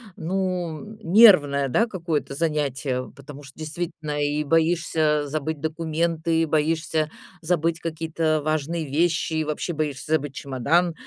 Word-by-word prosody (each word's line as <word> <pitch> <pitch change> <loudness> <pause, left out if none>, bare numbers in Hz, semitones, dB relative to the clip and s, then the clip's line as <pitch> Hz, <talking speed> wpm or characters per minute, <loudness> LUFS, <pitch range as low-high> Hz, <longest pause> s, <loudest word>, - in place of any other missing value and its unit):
ну, 185 +2 -3
нервное, 165 -9 +6
да, 230 - +2
какое-то 165 -8 -3
занятие. 140 -5 -1
Потому 140 0 -11
что, 135 +2 -14
действительно, 155 -2 -4
и 145 +1 0
боишься 160 -2 +1
забыть 155 +1 -3
документы, 160 +1 -1
и - - +2
боишься 155 0 0 0.3
забыть 165 0 0
какие-то 160 -1 -1
важные 155 +1 -1
вещи, 160 +3 0
и 155 0 +1
вообще 155 +3 -3
боишься 150 -1 -3
забыть 145 -3 0
чемодан. 150 +6 +1
155 Hz, 125 wpm, -24 LUFS, 150-165 Hz, 0.3 s, нервное